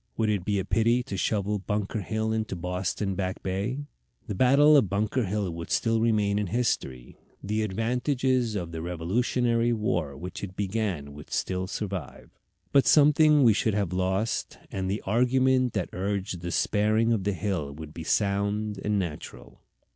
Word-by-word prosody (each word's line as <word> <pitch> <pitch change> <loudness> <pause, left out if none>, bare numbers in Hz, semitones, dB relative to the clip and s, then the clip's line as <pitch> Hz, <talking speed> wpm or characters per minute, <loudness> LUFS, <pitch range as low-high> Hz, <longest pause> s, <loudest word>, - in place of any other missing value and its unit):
Would 110 -1 +1
it 100 -4 -1
be 100 +1 0
a 95 - -1
pity 115 +2 +2
to 100 - -6
shovel 105 +1 0
Bunker 105 +1 -2
Hill 110 +3 -2
into 110 -3 -2
Boston 90 +3 -2
Back 95 0 -3
Bay? 105 +10 -2 0.4
The 110 - -4
battle 140 +8 +5
of 130 -10 +4
Bunker 105 +5 0
Hill 100 -1 -2
would 85 0 -7
still 115 -1 +1
remain 105 -3 +2
in 105 - -1
history, 85 - -2 0.2
the 105 +2 -1
advantages 125 +3 0
of 85 -4 -3
the 80 -1 -5
Revolutionary 115 +8 0
War 85 -10 -1
which 90 +3 -7
it 95 -2 -6
began 95 -8 -2
would 75 0 -11
still 95 0 -2
survive; 95 -4 -5 0.4
but 140 - +4
something 150 0 +6
we 115 -3 +6
should 105 0 0
have 100 -4 -1
lost, 95 +4 -1
and 95 -1 -2
the 100 +3 -2
argument 130 +3 +2
that 95 -4 -2
urged 95 -1 -3
the 85 - -4
sparing 110 +5 +2
of 105 -4 -1
the 100 +1 0
hill 90 -7 -2
would 75 +1 -9
be 80 - -7
sound 100 +2 0
and 105 0 +1
natural. 85 -6 -6
105 Hz, 170 wpm, -27 LUFS, 95-115 Hz, 0.4 s, something